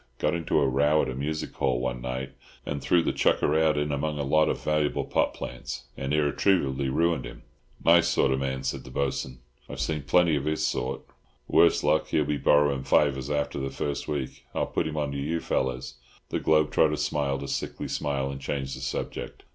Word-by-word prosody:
Got 75 - 0
into 85 -2 0
a 70 - +3
row 75 +4 +3
at - - -2
a - - -3
music 75 +4 -3
hall 65 -2 0
one 60 -1 -3
night, 65 +1 -4 0.3
and 70 -1 -3
threw 85 -1 +3
the - - 0
chucker 75 - +2
out 80 -1 +3
in 75 0 0
among 75 +1 -1
a 70 - -1
lot 80 +2 +3
of - - -1
valuable 75 -1 0
pot - - +1
plants, 60 0 -6
and 65 +1 -4
irretrievably 75 -2 +1
ruined 85 +4 +1
him." - - -10 0.4
"Nice 85 0 +6
sort 65 - +2
of 65 - +1
man," 65 -1 -2
said 65 - -3
the - - -11
Bo'sun. 65 -1 -3 0.3
"I've - - -7
seen 75 -2 -1
plenty 80 +4 +3
of 70 -1 -2
his 80 0 0
sort, 65 +1 -2 0.5
worse - - +4
luck; - - +2
he'll 75 - +1
be 75 0 -1
borrowing 70 -2 +3
fivers 70 -1 +2
after 75 -1 -1
the 70 0 -2
first 70 0 -3
week. 70 -4 -4
I'll - - +1
put - - -1
him 80 0 -5
on 75 -2 -1
to 70 - -3
you 80 +4 -1
fellows." 65 -4 -2 0.3
The - - -1
globe 75 -1 +3
trotter 75 -1 +3
smiled 70 -2 -1
a - - -5
sickly - - -3
smile, 70 -2 -2
and 70 0 -7
changed 70 -1 -3
the - - -9
subject. - - -5
70 Hz, 210 wpm, -27 LUFS, 65-75 Hz, 0.5 s, Nice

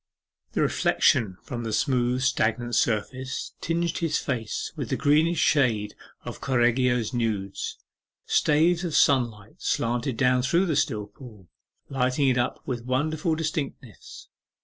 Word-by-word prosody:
The - - +1
reflection 95 -6 +2
from 120 -2 -5
the 115 - -3
smooth 125 +1 +1
stagnant 120 -2 0
surface 130 +5 -1
tinged 170 0 -1
his 165 -4 0
face 115 -6 -3
with - - -5
the - - 0
greenish 155 +4 +3
shades 115 -9 +2 0.3
of - - -7
Correggio's 125 -1 +1
nudes. 105 -5 -2 0.5
Staves 165 +4 +2
of 170 -4 -2
sunlight 115 -7 +2
slanted 120 +1 -1
down 125 -1 +3
through 170 +9 +2
the 160 -5 0
still 110 -7 0
pool, 105 - -14 0.4
lighting 135 +1 +1
it 130 - +1
up 120 - -1
with 120 -2 -4
wonderful 155 +6 0
distinctness. 150 - -5
125 Hz, 130 wpm, -25 LUFS, 115-145 Hz, 0.5 s, greenish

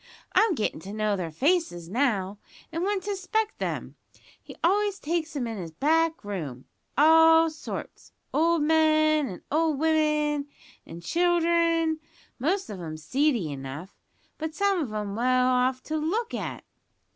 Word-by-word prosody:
I'm 435 -5 +4
gettin' 215 - -2
to 195 +5 -9
know 215 -1 0
their 180 -4 -3
faces 260 - 0
now, 205 -3 0 0.3
and 330 +1 -3
when 395 +1 0
to 410 +3 -4
expect 430 +2 -2
'em. - - -4 0.4
He - - -12
always 400 +3 +2
takes 325 -2 -2
'em 265 -4 -1
into 225 -4 -4
his 165 -2 -7
back 320 - +1
room 155 -11 -5 0.3
all 325 +2 +6
sorts, 310 - -8 0.2
old 330 0 +3
men 310 -1 +3
and 185 -6 -8
old 315 -1 +2
women 300 -1 +1 0.4
an' 165 +1 -9
children, 335 - +2 0.4
most 370 +9 0
of 190 -3 -7
'em 155 -2 -6
seedy 230 - 0
enough, 140 +7 -7 0.4
but 315 0 -4
some 400 -2 +2
of 260 -8 -3
'em 210 -2 -4
well 255 +2 +2
off 255 0 +1
to 315 - -3
look 410 +10 -1
at. - - -4
305 Hz, 150 wpm, -26 LUFS, 210-330 Hz, 0.4 s, all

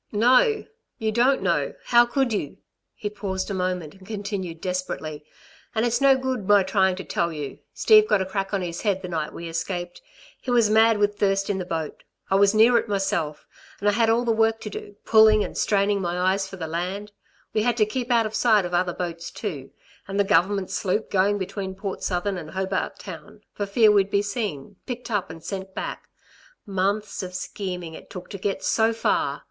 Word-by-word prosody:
"No, 255 - +4 0.3
you 220 -1 -1
don't 245 +1 +3
know! 170 -7 0
How 240 0 +5
could 260 -1 0
you?" 150 -9 -3 0.4
He 210 - -4
paused 200 -2 -4
a - - -1
moment, 180 -4 -2
and 190 -1 -17
continued 200 -5 -4
desperately: 170 -5 -4 0.5
"And 220 +2 +2
it's 240 +1 0
no 275 -1 +6
good 260 -6 -3
my 205 -1 +6
trying 190 -1 +2
to 190 - -6
tell 170 -1 -1
you; 145 -4 -6 0.2
Steve 430 -1 +6
got 205 - +3
a 190 - -1
crack 195 +1 -3
on 195 -3 -1
his 170 -1 -4
head 195 -3 0
the - - -4
night 160 -3 -3
we 170 - -7
escaped. 175 +1 -4 0.4
He - - -7
was 235 -3 +4
mad 220 0 +5
with 205 0 +1
thirst 195 0 +1
in 190 - -2
the 180 - -3
boat. 160 -3 -4 0.3
I - - +3
was 200 +1 +4
near 235 +2 +6
it - - -5
myself... 195 -7 -1 0.3
and 205 - -1
I - - +6
had 225 +2 +2
all 235 +2 +2
the 235 - +2
work 225 0 +2
to 210 - -6
do, 205 - -8
pulling 220 -1 +6
and - - -6
straining 200 -1 +1
my 175 -1 -2
eyes 190 +1 +1
for 190 - -9
the 170 -4 -5
land. 180 +6 -4 0.4
We 215 - +2
had 240 +1 +1
to 215 - +4
keep 240 +3 -4
out 235 -2 +3
of 215 - -4
sight 215 -6 +3
of 175 - -5
other 175 0 +1
boats 170 -1 -4
too, 150 - -6 0.4
and 195 +1 -3
the - - +5
Government 195 0 +2
sloop 210 +3 -1
going 200 +1 +3
between 190 0 -4
Port 195 0 -5
Southern 185 +1 -1
and 155 -2 -9
Hobart 190 +1 -2
Town, - - -10
for 205 - -3
fear 215 +2 +5
we'd 200 -1 +3
be 200 0 +2
seen, 200 - -4
picked 245 -1 -5
up 205 -6 -1
and 160 0 -10
sent 190 -1 -6
back. - - -5 0.6
Months 200 +2 -1
of 180 -1 -7
scheming 180 -3 -5
it - - -12
took 180 - -9
to 200 - -6
get 195 0 -2
so 225 0 +2
far! 225 - 0
200 Hz, 210 wpm, -24 LUFS, 185-220 Hz, 0.6 s, no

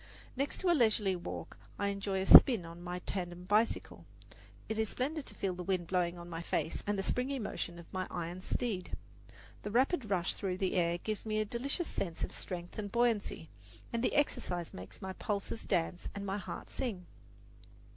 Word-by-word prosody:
Next 275 +2 -1
to 365 - +4
a - - +6
leisurely 215 - +3
walk 175 0 -6 0.2
I 200 - +1
enjoy 195 -1 -1
a - - -1
"spin" 225 -3 +10
on 170 +1 -9
my 175 0 -4
tandem 175 -2 -3
bicycle. 210 +4 +1 0.6
It 220 0 -2
is 220 -2 +1
splendid 290 +3 -2
to - - -9
feel 195 -2 -1
the 180 - -6
wind 180 -1 0
blowing 175 0 +1
in 170 0 -8
my 165 -1 -5
face 170 - -1
and 205 0 +1
the 195 - 0
springy 255 +6 0
motion 185 -6 -3
of 170 - -10
my 185 0 -1
iron 175 +1 -4
steed. 205 -4 -2 0.7
The - - -4
rapid 255 - +2
rush 185 -2 +1
through 185 -2 -2
the 190 -1 0
air 170 -2 +2
gives 215 +3 -3
me 215 -1 0
a 215 - +1
delicious 275 - -1
sense 170 -4 -3
of - - -2
strength 175 +2 -5
and 205 -2 -4
buoyancy, 230 -8 +1 0.4
and 235 +1 0
the - - +1
exercise 180 - 0
makes 90 - -9
my 190 0 -3
pulses 205 +3 -3
dance 175 -1 0
and 200 0 -4
my 195 +1 -1
heart - - -7
sing. 200 -9 -3
195 Hz, 195 wpm, -33 LUFS, 175-225 Hz, 0.7 s, spin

